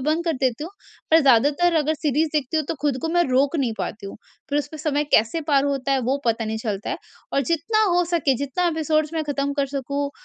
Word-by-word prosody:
बंद 320 +2 +1
कर 335 - +1
देती 260 +2 0
हूँ, 335 - -7 0.4
पर 320 +1 +7
ज़्यादातर, 285 +6 +4
अगर 310 0 +2
सीरीज़ 305 +1 0
देखती 300 0 -1
हूँ, 310 - +1
तो - - -1
खुद 285 -3 +1
को 325 - -1
मैं 345 +1 +3
रोक 275 +5 +2
नहीं 255 -5 0
पाती 205 -2 -5
हूँ। - - -8 0.3
फिर 290 - +2
उसमें 300 +2 -5
समय 295 -1 0
कैसे 225 +10 +3
पार 275 -1 +4
होता 275 -1 -1
है, 270 - +2
वो 255 +3 0
पता 230 0 +1
नहीं 220 0 -3
चलता 205 -2 -3
है। - - -3 0.3
और 275 - +2
जितना 430 +7 +1
हो 355 0 +3
सके, 285 -6 +2
जितना 285 +6 -1
एपिसोड्स 310 -1 0
मैं 320 - 0
ख़त्म 285 -1 -2
कर 275 - +1
सकूँ, 280 +1 -2
285 Hz, 235 wpm, -23 LUFS, 265-315 Hz, 0.4 s, पर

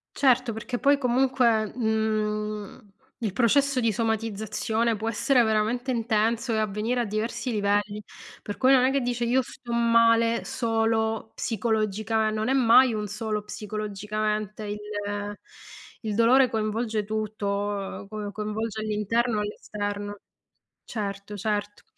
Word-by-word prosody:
Certo, 255 -3 +3
perché 235 +3 -4
poi 280 +2 +4
comunque, 245 -4 +2
uhm, 215 -3 -2 0.3
il 220 -5 -2
processo 260 +4 +3
di 230 -2 +2
somatizzazione 220 +1 -1
può 220 +1 -3
essere 245 +3 +3
veramente 225 +3 0
intenso 230 0 +1
e 220 - +1
avvenire 215 +3 0
a - - +1
diversi 225 +4 -2
livelli, 205 -1 0 0.4
per 205 - -6
cui 260 +1 +5
non 255 -2 +6
è 260 - +4
che 275 - +2
dice 245 -1 -1
io 245 +3 +3
sto 240 -1 -9
male 230 0 +4
solo 225 -1 0
psicologica 220 -1 0
non 215 +1 -1
è - - +3
mai 255 -1 +6
un 210 -1 -2
solo 215 +1 -3
psicologicamente 210 0 -3
il 205 0 -4 1.3
il 215 -2 -2
dolore 250 +3 +5
coinvolge 220 0 -1
tutto, 205 -2 -3
ehm, 195 - -14
co 210 -1 -5
coinvolge 215 +1 -3
all'interno 215 +2 0
e - - +1
all'esterno. 205 0 -4 0.7
Certo, 200 -1 -5
certo. 205 0 -3
220 Hz, 130 wpm, -26 LUFS, 210-235 Hz, 1.3 s, non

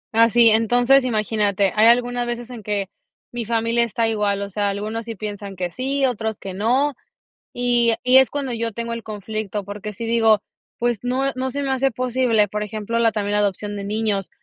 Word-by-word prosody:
Así, 230 0 +6
entonces 245 +4 +4
imagínate, 210 -4 0
hay 215 +1 +5
algunas 245 0 +2
veces 240 +1 -5
en 235 -3 -8
que 200 -2 -2 0.4
mi 240 -2 -4
familia 230 +1 +1
está 230 0 0
igual, 205 -2 0
o 200 - -6
sea, 205 +1 0
algunos 215 +3 -4
sí 230 -1 -6
piensan 205 -1 -6
que 180 -1 -3
sí, 270 +4 -1
otros 220 -4 -2
que 195 - -7
no, 250 +9 +1 0.6
y 240 -2 +2
y 250 +1 +6
es 265 -1 +6
cuando 275 -3 -3
yo 230 0 -2
tengo 235 +2 -4
el 230 - -5
conflicto, 215 -1 -5
porque 205 +1 -6
si 220 +3 -6
digo, 225 -2 +3 0.3
pues 240 -3 0
no, 255 +2 0
eh, - - -6
no 260 +1 -2
se 285 +2 -3
me 270 - -1
hace 265 +1 +2
posible, 245 -3 +1
por 210 +2 -4
ejemplo, 215 +2 -3
la 225 -1 +3
también 205 -1 -2
la 210 - +2
adopción 205 0 -1
de 200 - -5
niños, 210 -2 -1
225 Hz, 205 wpm, -21 LUFS, 210-245 Hz, 0.6 s, Así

